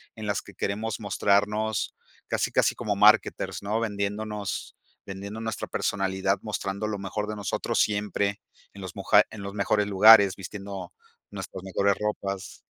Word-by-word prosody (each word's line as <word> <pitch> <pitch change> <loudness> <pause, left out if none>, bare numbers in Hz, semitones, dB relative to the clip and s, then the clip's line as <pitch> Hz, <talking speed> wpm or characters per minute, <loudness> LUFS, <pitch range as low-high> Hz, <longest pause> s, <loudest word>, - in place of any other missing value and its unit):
en 110 -1 -6
las 100 - 0
que - - -14
queremos 105 +2 -2
mostrarnos 105 +1 +1 0.3
casi, - - -1
casi - - +2
como - - -2
marketers, - - +3
¿no? 105 +3 0
Vendiéndonos, 105 -1 -3 0.3
vendiendo 100 +3 -7
nuestra 110 -1 -4
personalidad, 95 0 0
mostrando 105 -1 -3
lo 105 -2 -3
mejor 105 +2 -3
de 110 - -4
nosotros 100 - -2
siempre 100 -1 0 0.3
en 100 - -11
los 95 -2 -7
muja - - +5
en 110 - -8
los 100 0 -6
mejores 105 0 +1
lugares, 100 0 +7
vistiendo 100 -1 -7 0.4
nuestras 95 -1 -7
mejores 100 +1 +1
ropas. 100 -3 -4
100 Hz, 145 wpm, -26 LUFS, 100-105 Hz, 0.4 s, lugares